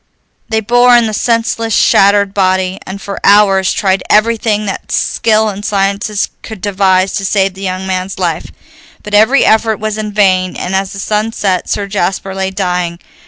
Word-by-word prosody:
They 220 0 0
bore 245 +2 +4
in 235 - +2
the 215 - -3
senseless, 230 0 0
shattered 200 0 +3
body, 185 -1 0
and 190 +1 -6
for 200 0 -7
hours 195 -2 +4
tried 190 -2 0
everything 215 -1 +1
that 195 - -6
skill 220 -1 +1
and 205 0 -7
sciences 200 0 -1
could 220 -3 -9
devise 190 -1 +1
to 195 - -4
save 195 -1 0
the 190 - -12
young 185 0 -4
man's 185 0 -3
life. - - -3 0.5
But 210 - -9
every 220 +7 +4
effort 220 0 +2
was 215 0 -3
in 210 -1 -4
vain, 185 -3 +1
and 180 - -4
as 190 0 -1
the - - -8
sun 215 +2 -2
set 190 -5 -1
Sir 205 - -1
Jasper 195 -1 -2
lay 190 0 -2
dying. 180 -3 -2
200 Hz, 175 wpm, -13 LUFS, 190-215 Hz, 0.5 s, bore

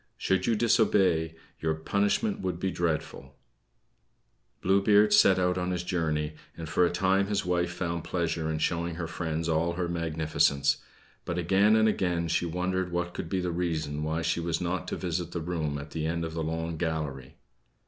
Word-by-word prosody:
Should 95 0 0
you 115 - +3
disobey, 95 -8 +3 0.2
your 80 0 0
punishment 100 - 0
would 90 -2 -3
be 95 +1 -1
dreadful." 75 -5 -3 1.3
Blue 95 +2 +4
Beard 105 +1 +5
set 95 -2 +6
out 90 0 +1
on 90 0 -1
his 90 -1 -2
journey, 80 -4 -1 0.2
and 80 - -6
for 85 +3 +2
a 85 - +4
time 95 +2 +2
his 100 -2 -1
wife 90 -1 0
found 85 -2 -3
pleasure 85 -2 -1
in 80 - -1
showing 85 +1 -1
her 85 0 -3
friends 80 -1 -3
all 85 +1 +1
her 90 0 -2
magnificence; 80 -4 +1 0.5
but 85 - -3
again 95 +5 +4
and 110 0 +4
again 90 -5 0
she 85 +1 0
wondered 90 +1 -1
what 85 0 -2
could 80 - -5
be 95 +1 0
the 90 -1 -1
reason 80 -4 -2
why 80 +2 -1
she 80 - 0
was 85 -1 -1
not 90 +1 -2
to - - -2
visit 85 -1 -3
the 85 - -2
room 80 -3 -2
at 70 +1 -8
the 80 -1 -2
end 85 0 -1
of 80 - -6
the 80 - -3
long 80 +1 -3
gallery. 75 -6 -3
85 Hz, 190 wpm, -28 LUFS, 80-90 Hz, 1.3 s, set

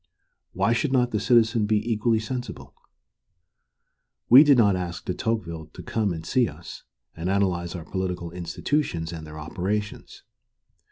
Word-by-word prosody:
Why 115 - +2
should 135 +3 0
not 125 -2 +2
the 105 - 0
citizen 115 0 +3
be 110 +2 0
equally 110 +1 +1
sensible? 125 +3 -6 1.6
We 130 +5 +10
did 145 -3 +5
not 100 -5 +4
ask 90 -1 -5
De 90 - -2
Tocqueville 85 -8 -3
to - - -10
come 110 -4 -1
and 80 -1 -6
see 125 +6 +2
us 80 +3 -11 0.3
and 85 +3 -3
analyze 90 -3 0
our 85 -3 -7
political 90 -3 -4
institutions 85 - -2
and 80 -2 -8
their 75 0 -10
operations. 95 +7 -4
100 Hz, 150 wpm, -25 LUFS, 85-115 Hz, 1.6 s, We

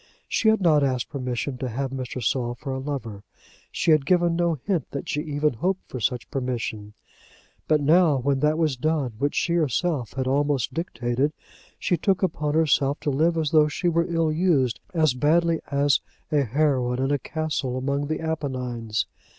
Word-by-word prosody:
She 220 - +2
had 220 -1 +3
not 155 -5 +4
asked 130 -3 0
permission 125 0 -3
to 130 - -3
have 130 +3 -3
Mr. 130 -2 -5
Saul 120 +1 0
for 135 +2 -5
a 130 - -3
lover. 130 -7 -5 0.5
She - - +1
had 155 -2 +5
given 175 +1 +2
no 170 -1 +1
hint 165 +1 -2
that 140 - -6
she 150 - -1
even 150 -1 0
hoped 185 +11 -2
for 130 - -6
such 120 0 -2
permission. 115 -5 -3 0.7
But 155 -1 +3
now 155 0 +4
when 135 +1 0
that 150 +2 +2
was 155 -4 +1
done 145 -1 0
which 145 +2 0
she 170 - +1
herself 155 -4 0
had 130 0 -2
almost 140 -1 +1
dictated, 130 -3 -1 0.4
she 175 - 0
took 195 +3 +1
upon 150 -5 0
herself 145 -3 +2
to 145 - 0
live 165 +5 +2
as 155 -3 0
though 155 -1 +5
she 175 +4 -1
were 170 +1 0
ill 165 -2 +1
used 155 -8 +2
as 155 -6 +2
badly 165 +5 +2
as 140 0 +2 0.3
a 150 -2 +3
heroine 130 -1 +1
in 135 - 0
a 145 - +1
castle 150 -3 -3
among 140 +2 -1
the 155 +1 -2
Apennines! 125 -8 -2
145 Hz, 185 wpm, -24 LUFS, 130-160 Hz, 0.7 s, had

